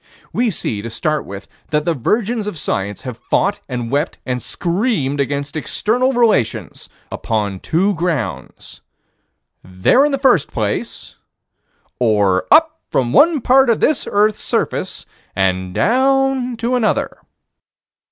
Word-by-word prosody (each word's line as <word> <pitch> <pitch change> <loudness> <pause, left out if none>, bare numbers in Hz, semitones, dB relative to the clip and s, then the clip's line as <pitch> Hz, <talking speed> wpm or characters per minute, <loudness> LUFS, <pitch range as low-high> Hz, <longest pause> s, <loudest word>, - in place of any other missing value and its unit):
We 245 -1 +1
see, 110 - -3
to 115 - -6
start 150 +6 -2
with, 100 0 -8 0.2
that 150 0 -1
the 170 - +1
virgins 215 - -1
of 210 - -5
science 100 -7 -3
have 125 -4 -7
fought 200 +10 0
and 120 -2 -4
wept 145 +4 -1
and 125 -1 -2
screamed 170 - -1
against 140 +1 -2
external 240 - 0
relations 230 - 0 0.2
upon 105 -4 -2
two 190 - +1
grounds: 165 - -4 0.8
There 95 - +2
in 295 - +2
the 275 - 0
first 260 - +2
place; - - -4 0.8
Or 105 -6 +2
up 320 +1 +4
from 120 -2 0
one 315 -2 +5
part 265 +2 +4
of 230 - +2
this 310 - +1
earth's 210 +1 +2
surface - - -2 0.3
and 95 -1 0
down 265 - +1
to 235 +2 -2
another. 240 -4 0
170 Hz, 135 wpm, -18 LUFS, -, 0.8 s, one